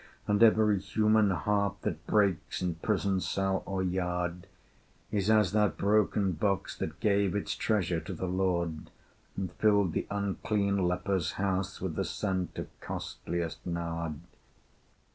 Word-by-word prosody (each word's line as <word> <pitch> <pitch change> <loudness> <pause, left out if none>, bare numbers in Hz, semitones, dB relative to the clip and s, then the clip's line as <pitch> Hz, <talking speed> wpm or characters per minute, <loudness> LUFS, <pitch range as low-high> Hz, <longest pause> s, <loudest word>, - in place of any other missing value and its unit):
And 105 0 +2
every 110 -3 +5
human 110 +1 +3
heart 100 +2 0
that 80 0 -3
breaks, 100 -5 +1
In 90 -1 0
prison 95 +2 0
cell 95 0 0
or 95 -1 -1
yard, 90 0 -2 0.6
Is 100 0 0
as 105 -4 +4
that 105 -2 +2
broken 105 -1 +2
box 100 +3 -1
that - - -4
gave 100 -2 +2
Its 105 - -2
treasure 95 -6 0
to 95 - -7
the 95 - -3
Lord, 90 -3 -1 0.5
And 95 -3 -2
filled 100 -2 +3
the - - -2
unclean 100 -1 0
leper's 90 -1 0
house 95 -1 -1
With 95 -3 -3
the - - -1
scent 95 -3 -2
of - - -4
costliest 85 -1 -4
nard. 85 -2 -3
95 Hz, 140 wpm, -30 LUFS, 90-100 Hz, 0.6 s, every